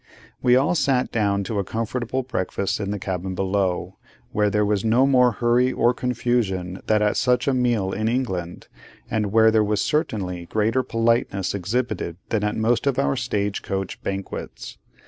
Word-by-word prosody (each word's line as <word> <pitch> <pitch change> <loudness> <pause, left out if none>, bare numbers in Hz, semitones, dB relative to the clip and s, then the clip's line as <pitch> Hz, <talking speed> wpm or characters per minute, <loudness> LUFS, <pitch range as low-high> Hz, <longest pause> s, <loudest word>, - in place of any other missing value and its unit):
We 125 -1 +5
all 140 +7 +3
sat 135 -5 +1
down 100 -3 +1
to 105 +1 -2
a - - 0
comfortable 120 +5 -3
breakfast 100 -5 -2
in 100 -1 -3
the 105 - -2
cabin 95 -1 -4
below, 95 -1 -1 0.3
where 105 0 +2
there 105 +1 +1
was 105 -1 0
no 115 +4 +4
more 125 -3 +4
hurry 120 +3 +2
or 120 -1 +2
confusion 115 -7 -1
than 105 -1 +3
at 105 - +1
such 125 +1 +2
a 135 - +3
meal 120 -6 +1
in 110 +2 -1
England, 95 -8 -2 0.4
and 105 -2 0
where 110 0 +5
there 110 -1 +3
was 105 0 0
certainly 100 - -1
greater 110 +6 +1
politeness 115 -5 0
exhibited 100 -3 -2
than 110 -2 0
at 105 0 -1
most 115 +5 +1
of 135 - +1
our 135 0 +1
stage 105 -6 -2
coach 95 -1 -4
banquets. 95 0 -6
110 Hz, 170 wpm, -23 LUFS, 100-125 Hz, 0.4 s, We